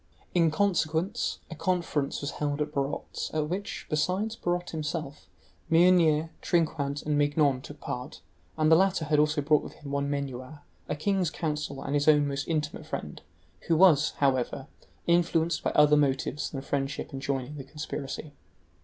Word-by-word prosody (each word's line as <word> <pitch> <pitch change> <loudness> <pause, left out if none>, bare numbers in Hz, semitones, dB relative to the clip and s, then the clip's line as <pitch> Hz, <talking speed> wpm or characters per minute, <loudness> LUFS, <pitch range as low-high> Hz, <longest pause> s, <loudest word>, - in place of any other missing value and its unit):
In 170 -2 +4
consequence, 180 +2 0
a - - -5
conference 165 -5 -1
was 145 - -3
held 145 -1 -2
at 150 0 -1
Barot's, 140 0 -3
at 150 -1 0
which, 195 +3 -4
besides 185 +9 0
Barot 175 -3 -2
himself, 155 -2 -4 0.4
Meunier, 165 -2 +4
Trinquant, 150 -4 0
and 150 -1 +1
Mignon 145 -2 +2
took 145 +2 -11
part, 125 +1 -6 0.4
and 155 0 +3
the - - +9
latter 190 -2 +2
had 150 0 +2
also 150 0 +2
brought 150 +1 +4
with - - -9
him 145 -3 -10
one 140 0 -1
Menuau, 140 0 -4 0.3
a - - 0
king's 185 +3 +1
counsel 150 -4 -3
and 140 - -3
his 145 0 +1
own 150 -2 +5
most 140 0 -3
intimate 155 -3 -2
friend, - - -5 0.5
who 165 - +3
was, 155 -4 +5
however, 135 -1 +1 0.4
influenced 170 -1 +2
by - - 0
other 150 0 +6
motives 140 0 0
than 135 - -5
friendship 140 +1 -3
in 135 - -4
joining 135 +1 -3
the 135 - -6
conspiracy. 150 0 -6
150 Hz, 160 wpm, -28 LUFS, 140-165 Hz, 0.5 s, the